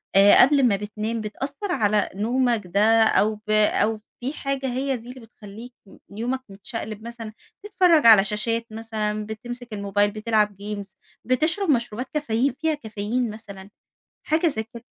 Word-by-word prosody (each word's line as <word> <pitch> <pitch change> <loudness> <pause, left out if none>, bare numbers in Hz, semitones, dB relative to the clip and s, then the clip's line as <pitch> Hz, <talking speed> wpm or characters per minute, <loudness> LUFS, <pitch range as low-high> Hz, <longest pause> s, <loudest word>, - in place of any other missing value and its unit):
آآ، 200 +1 +7
قبل 275 +1 +5
ما 210 - +2
بتنام 215 +3 -4
بتأثر 280 - -5
على 210 - +1
نومك 235 +2 +1
ده، 215 +5 +4
أو 215 0 +2
ب 215 0 -18
أو 215 0 +2 0.2
في 260 +4 -4
حاجة 275 -2 -3
هي 265 +1 -1
دي 235 +1 -13
اللي 255 +1 -9
بتخليك 225 +1 -12 0.4
يومك 245 +4 -2
متشقلب 215 +2 -7
مثلًا، 230 -2 -8 0.3
تتفرج 360 - +3
على 215 -4 +8
شاشات 230 +3 -1
مثلًا، 215 -1 -3
بتمسك 240 +2 -8
الموبايل 205 0 0
بتلعب 215 -1 0
Games 205 -2 -6 0.3
بتشرب 315 - 0
مشروبات 240 -2 0
كافيين 275 -3 0
فيها 320 -1 +1
كافيين 225 -2 -3
مثلًا، 200 -3 -10 0.5
حاجة 315 +3 +1
زي 220 -9 0
كده؟ 235 +1 -13
225 Hz, 150 wpm, -23 LUFS, 210-255 Hz, 0.5 s, على